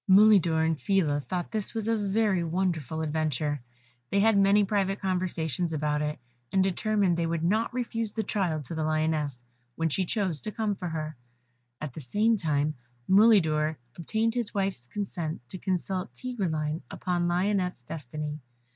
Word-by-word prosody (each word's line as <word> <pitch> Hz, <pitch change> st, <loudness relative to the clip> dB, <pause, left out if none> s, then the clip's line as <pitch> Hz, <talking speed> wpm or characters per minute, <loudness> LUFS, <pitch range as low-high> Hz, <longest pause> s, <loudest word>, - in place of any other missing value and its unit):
Mulidor 190 Hz, -5 st, +6 dB
and 160 Hz, -2 st, 0 dB
Phila 165 Hz, -8 st, +2 dB
thought 175 Hz, +6 st, -4 dB
this 215 Hz, 0 st, -3 dB
was 220 Hz, -1 st, -2 dB
a 225 Hz, -, +3 dB
very 205 Hz, -3 st, +1 dB
wonderful 165 Hz, -3 st, -1 dB
adventure; 150 Hz, -2 st, -1 dB, 0.5 s
they 200 Hz, -, +2 dB
had 220 Hz, +1 st, +5 dB
many 200 Hz, +1 st, +5 dB
private 195 Hz, -1 st, 0 dB
conversations 180 Hz, -4 st, -1 dB
about 150 Hz, -1 st, 0 dB
it, 150 Hz, 0 st, -2 dB, 0.3 s
and 190 Hz, -1 st, +4 dB
determined 195 Hz, -1 st, +1 dB
they 170 Hz, -1 st, 0 dB
would 165 Hz, -1 st, -1 dB
not 215 Hz, +6 st, +2 dB
refuse 230 Hz, -3 st, -2 dB
the 220 Hz, -, -1 dB
child 175 Hz, -8 st, -1 dB
to 165 Hz, -, -6 dB
the 160 Hz, -1 st, -1 dB
Lioness, 155 Hz, -4 st, 0 dB, 0.3 s
when 165 Hz, 0 st, 0 dB
she 190 Hz, +6 st, 0 dB
chose 185 Hz, -5 st, -1 dB
to 215 Hz, -, -4 dB
come 215 Hz, -1 st, -1 dB
for 185 Hz, -2 st, -5 dB
her; 155 Hz, -1 st, -4 dB, 0.6 s
at 155 Hz, -4 st, -5 dB
the 155 Hz, -, -7 dB
same 210 Hz, -, +2 dB
time, 155 Hz, -5 st, +1 dB, 0.3 s
Mulidor 165 Hz, -7 st, +5 dB, 0.2 s
obtained 220 Hz, +7 st, 0 dB
his 235 Hz, -4 st, -2 dB
wife's 195 Hz, -11 st, -1 dB
consent 170 Hz, -1 st, -4 dB
to 185 Hz, -, -7 dB
consult 185 Hz, 0 st, -2 dB
Tigreline 165 Hz, -11 st, -2 dB
upon 175 Hz, -1 st, -1 dB
Lionette's 180 Hz, -4 st, 0 dB
destiny. 150 Hz, +2 st, -5 dB
180 Hz, 160 wpm, -28 LUFS, 155-205 Hz, 0.6 s, Mulidor